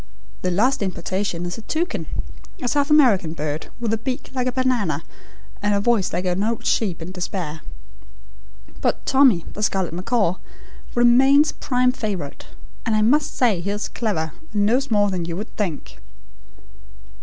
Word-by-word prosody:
The 185 Hz, -, 0 dB
last 220 Hz, +10 st, +2 dB
importation 185 Hz, -2 st, -2 dB
is 175 Hz, +4 st, -4 dB
a -, -, -8 dB
toucan, 320 Hz, +10 st, -2 dB, 0.5 s
a 250 Hz, -, -3 dB
South 285 Hz, +3 st, +1 dB
American 230 Hz, -, +4 dB
bird, 150 Hz, -1 st, -4 dB
with 230 Hz, -2 st, -1 dB
a 225 Hz, -, 0 dB
beak 255 Hz, +4 st, -4 dB
like 255 Hz, -1 st, -1 dB
a -, -, +1 dB
banana, 240 Hz, -, 0 dB, 0.6 s
and 205 Hz, 0 st, +2 dB
a -, -, +2 dB
voice 210 Hz, -3 st, +2 dB
like 180 Hz, +2 st, -2 dB
an 180 Hz, +2 st, 0 dB
old 230 Hz, +1 st, -2 dB
sheep 180 Hz, -7 st, 0 dB
in 175 Hz, -, -7 dB
despair. 175 Hz, -4 st, -4 dB, 1.2 s
But -, -, 0 dB
Tommy, 265 Hz, -11 st, +4 dB
the 210 Hz, -, -6 dB
scarlet 190 Hz, -5 st, 0 dB
macaw, 185 Hz, 0 st, 0 dB, 0.6 s
remains 265 Hz, +5 st, +5 dB
prime 250 Hz, -1 st, +1 dB
favourite, 200 Hz, -, -5 dB, 0.4 s
and 225 Hz, -2 st, +1 dB
I 215 Hz, -, +3 dB
must 290 Hz, +7 st, +2 dB
say 220 Hz, -9 st, +3 dB
he 190 Hz, -, -3 dB
is 205 Hz, +1 st, -2 dB
clever 165 Hz, -9 st, -2 dB, 0.2 s
and 205 Hz, -2 st, +1 dB
knows 255 Hz, +6 st, +2 dB
more 205 Hz, -2 st, +3 dB
than 180 Hz, -3 st, -2 dB
you 170 Hz, 0 st, -4 dB
would 210 Hz, +3 st, -7 dB
think." 155 Hz, -, -4 dB
210 Hz, 165 wpm, -22 LUFS, 180-250 Hz, 1.2 s, remains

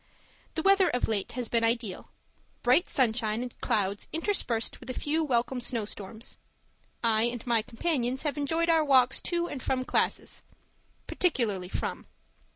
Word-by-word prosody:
The 320 Hz, -, -1 dB
weather 390 Hz, -1 st, +5 dB
of 245 Hz, -, 0 dB
late 210 Hz, -3 st, -2 dB
has 245 Hz, -1 st, -2 dB
been 230 Hz, 0 st, +1 dB
ideal 230 Hz, -4 st, -1 dB, 0.5 s
bright 260 Hz, +9 st, +4 dB
sunshine 225 Hz, -3 st, +1 dB
and 250 Hz, -, -9 dB
clouds 200 Hz, -1 st, 0 dB
interspersed 315 Hz, -, 0 dB
with -, -, -11 dB
a 255 Hz, -, -3 dB
few 315 Hz, +2 st, 0 dB
welcome 250 Hz, -2 st, 0 dB
snow 235 Hz, -3 st, -1 dB
storms. 215 Hz, +3 st, -7 dB, 0.6 s
I 225 Hz, -1 st, +3 dB
and 240 Hz, -1 st, -3 dB
my 235 Hz, -2 st, +3 dB
companions 255 Hz, +1 st, -1 dB
have 295 Hz, -2 st, -1 dB
enjoyed 320 Hz, +3 st, 0 dB
our 325 Hz, -2 st, +4 dB
walks 260 Hz, -4 st, +4 dB
to 345 Hz, -1 st, -1 dB
and 275 Hz, -, -6 dB
from 255 Hz, 0 st, -1 dB
classes -, -, 0 dB, 0.6 s
particularly 215 Hz, -, 0 dB
from. -, -, -3 dB
245 Hz, 155 wpm, -29 LUFS, 225-295 Hz, 0.6 s, weather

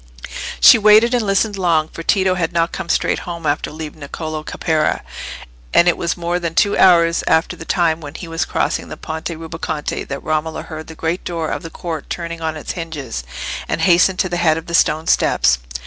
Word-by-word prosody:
She -, -, +8 dB
waited 215 Hz, +3 st, +6 dB
and 245 Hz, -2 st, +2 dB
listened 200 Hz, 0 st, +1 dB
long, 165 Hz, -4 st, +2 dB
for 165 Hz, -, -9 dB
Tito 190 Hz, +2 st, +2 dB
had 175 Hz, -2 st, -1 dB
not 170 Hz, 0 st, +1 dB
come 170 Hz, -, -6 dB
straight -, -, +1 dB
home 170 Hz, -2 st, -7 dB
after 145 Hz, 0 st, 0 dB
leaving 155 Hz, 0 st, -8 dB
Niccolò 155 Hz, +2 st, -5 dB
Caparra, 155 Hz, 0 st, 0 dB, 0.7 s
and 170 Hz, -, +6 dB
it 175 Hz, -, +4 dB
was 170 Hz, -, -2 dB
more 175 Hz, +1 st, -1 dB
than 170 Hz, -2 st, -4 dB
two 200 Hz, -, +3 dB
hours 170 Hz, -2 st, +5 dB
after 160 Hz, +1 st, +2 dB
the 165 Hz, -, -10 dB
time 165 Hz, -3 st, +1 dB
when 145 Hz, 0 st, -9 dB
he 175 Hz, -, -7 dB
was 165 Hz, 0 st, -1 dB
crossing -, -, -1 dB
the -, -, -7 dB
Ponte 160 Hz, +1 st, -5 dB
Rubaconte 160 Hz, -2 st, -4 dB
that 140 Hz, 0 st, -5 dB
Romola 155 Hz, +1 st, -2 dB
heard 155 Hz, -1 st, -8 dB
the 160 Hz, -, -10 dB
great 165 Hz, +3 st, -2 dB
door 165 Hz, -2 st, -3 dB
of -, -, -3 dB
the 165 Hz, -, -7 dB
court 165 Hz, -3 st, -6 dB
turning 170 Hz, -1 st, -5 dB
on 160 Hz, -1 st, -2 dB
its 155 Hz, -, -5 dB
hinges, 150 Hz, -, -5 dB, 0.4 s
and -, -, -2 dB
hastened 185 Hz, +1 st, +4 dB
to 185 Hz, -, +1 dB
the 175 Hz, -, -2 dB
head 160 Hz, -2 st, +3 dB
of 165 Hz, -, -6 dB
the 170 Hz, -, -8 dB
stone 160 Hz, -1 st, +3 dB
steps. -, -, +3 dB
165 Hz, 210 wpm, -19 LUFS, 155-175 Hz, 0.7 s, She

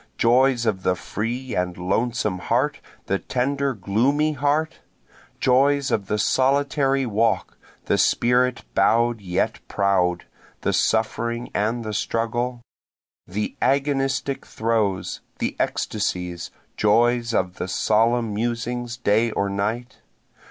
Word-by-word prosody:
Joys 125 Hz, +1 st, +3 dB
of 100 Hz, -4 st, 0 dB
the 90 Hz, 0 st, +1 dB
free 120 Hz, +7 st, -4 dB
and 90 Hz, -1 st, -1 dB
lonesome 105 Hz, +2 st, -1 dB
heart, 130 Hz, +8 st, 0 dB, 0.3 s
the 100 Hz, -, 0 dB
tender, 135 Hz, +1 st, -1 dB
gloomy 125 Hz, +10 st, +1 dB
heart? 145 Hz, +3 st, 0 dB, 0.6 s
Joys 140 Hz, +1 st, +3 dB
of 100 Hz, -4 st, 0 dB
the 105 Hz, -, 0 dB
solitary 135 Hz, +3 st, +2 dB
walk, 115 Hz, 0 st, 0 dB, 0.3 s
the -, -, +1 dB
spirit 125 Hz, +1 st, +2 dB
bow'd 115 Hz, +3 st, +3 dB
yet 90 Hz, -2 st, -1 dB
proud, 90 Hz, -3 st, +1 dB, 0.4 s
the -, -, 0 dB
suffering 115 Hz, +2 st, 0 dB
and 115 Hz, +3 st, 0 dB
the 110 Hz, -, -4 dB
struggle? 120 Hz, +3 st, -1 dB, 0.7 s
The 105 Hz, +4 st, -3 dB
agonistic 135 Hz, 0 st, 0 dB
throes, 110 Hz, -5 st, -1 dB, 0.2 s
the -, -, -2 dB
ecstasies, 90 Hz, -1 st, -2 dB, 0.3 s
joys 120 Hz, +2 st, +3 dB
of 90 Hz, -4 st, -1 dB
the -, -, -3 dB
solemn 115 Hz, +3 st, +2 dB
musings 120 Hz, +2 st, -2 dB
day 115 Hz, 0 st, +2 dB
or 100 Hz, -2 st, -1 dB
night? 110 Hz, +5 st, -3 dB
115 Hz, 115 wpm, -23 LUFS, 105-130 Hz, 0.7 s, Joys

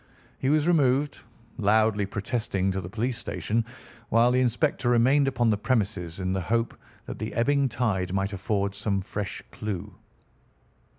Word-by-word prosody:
He 130 Hz, -, 0 dB
was 155 Hz, +1 st, +3 dB
removed, 145 Hz, -4 st, +2 dB, 0.4 s
loudly 105 Hz, -1 st, +3 dB
protesting, 100 Hz, -2 st, -1 dB
to 95 Hz, 0 st, -2 dB
the 85 Hz, -, -7 dB
police 115 Hz, +4 st, -2 dB
station, 115 Hz, -1 st, -1 dB, 0.5 s
while 115 Hz, +2 st, +4 dB
the 125 Hz, -, +3 dB
inspector 125 Hz, +1 st, +1 dB
remained 130 Hz, +4 st, +4 dB
upon 120 Hz, -4 st, +2 dB
the 105 Hz, -, +1 dB
premises 100 Hz, -8 st, -1 dB
in 95 Hz, 0 st, -1 dB
the 95 Hz, -, -1 dB
hope 115 Hz, +5 st, 0 dB, 0.3 s
that -, -, -7 dB
the 110 Hz, -, -3 dB
ebbing 140 Hz, +3 st, +2 dB
tide 105 Hz, -7 st, -1 dB
might 100 Hz, +1 st, -1 dB
afford 100 Hz, +1 st, -1 dB
some 100 Hz, -1 st, -1 dB
fresh 100 Hz, +1 st, -5 dB
clue. 105 Hz, -1 st, -5 dB
110 Hz, 155 wpm, -26 LUFS, 100-125 Hz, 0.5 s, while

